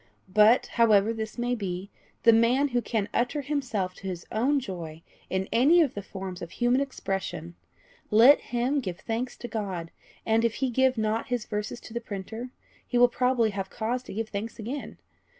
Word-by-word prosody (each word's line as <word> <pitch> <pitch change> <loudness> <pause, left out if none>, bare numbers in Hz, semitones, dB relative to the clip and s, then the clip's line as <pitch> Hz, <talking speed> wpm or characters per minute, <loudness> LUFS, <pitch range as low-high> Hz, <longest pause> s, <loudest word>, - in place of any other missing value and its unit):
But, 215 +4 +6
however 220 -2 +3
this 220 0 -5
may 245 +1 0
be, 195 -3 -4 0.3
the 230 - +7
man 245 +5 +3
who 245 -1 +1
can 215 -3 -1
utter 245 +5 0
himself 255 -10 -2
to 190 - -9
his 180 -2 -5
own 270 +6 +2
joy 170 -8 -7 0.3
in 190 0 -1
any 285 +9 +5
of 295 -6 +1
the 205 - -5
forms 190 -2 -7
of 170 - -6
human 245 +5 +1
expression 190 - -4 0.6
let 235 +7 +7
him 245 +4 0
give 185 -8 -5
thanks 235 +2 -3
to 240 - -6
God; 190 -7 -4 0.3
and, 225 +1 +2
if 230 -1 +1
he 265 -2 -1
give 260 +1 +3
not 220 +1 0
his 245 -4 -2
verses 210 +2 -4
to 220 - -11
the 235 - -3
printer, 220 +3 -6 0.4
he 245 - 0
will 245 0 +6
probably 250 -2 +2
have 195 -1 -4
cause 235 +3 -2
to - - -10
give 225 0 -3
thanks 215 +2 -5
again. 250 +6 -6
225 Hz, 185 wpm, -27 LUFS, 200-245 Hz, 0.6 s, the